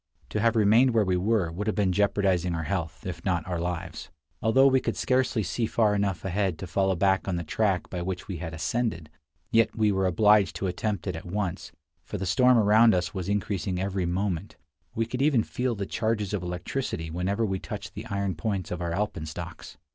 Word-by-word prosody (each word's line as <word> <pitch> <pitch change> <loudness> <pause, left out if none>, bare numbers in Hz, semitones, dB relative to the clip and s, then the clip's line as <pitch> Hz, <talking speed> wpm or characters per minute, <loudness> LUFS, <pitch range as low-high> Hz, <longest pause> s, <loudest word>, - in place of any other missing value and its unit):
To 105 - -2
have 115 +1 +2
remained 115 +4 +4
where 110 -2 +4
we 95 -1 +1
were 95 -2 +1
would 100 +6 -4
have 110 - 0
been 100 -3 +2
jeopardizing 95 -3 +1
our 80 - -2
health, 85 -2 -3
if 90 -2 -5
not 90 -4 0
our 90 -2 -2
lives. 90 +2 -4 0.3
Although 130 +5 +4
we 135 -1 +5
could - - -3
scarcely 130 -3 +1
see 110 +5 -1
far 110 -2 +2
enough 100 -4 -1
ahead 95 -2 0
to 95 - -6
follow 95 +1 +1
back 95 +2 +2
on 95 - 0
the 85 - -2
track 95 +3 0
by 90 - -3
which 90 +3 -4
we 95 -4 -4
had 80 0 -5
ascended, 80 -2 -2 0.4
yet 115 -1 +3
we 110 -2 +3
were 95 -1 +1
obliged 105 +3 +4
to - - -3
attempt 100 +2 -2
it 95 -4 -2
at 80 - -8
once, 100 -1 -3 0.3
for - - -5
the 95 - -3
storm 125 +7 +4
around 110 0 +5
us 90 -2 -1
was 95 -1 -4
increasing 100 -3 -1
every 95 -1 -1
moment; 90 -1 -2 0.4
we 115 - +1
could 125 +3 -4
even 135 -6 +3
feel 125 +1 -2
the 100 -1 -3
charges 110 -2 -1
of 100 - -1
electricity 90 -1 -4
whenever 95 +6 0
we 95 -2 -2
touched 100 -1 -7
the - - -7
iron 100 -3 -1
points 95 +2 -3
of 90 0 -3
our 85 -1 -2
alpenstocks. 85 -5 -5
100 Hz, 210 wpm, -27 LUFS, 90-110 Hz, 0.4 s, we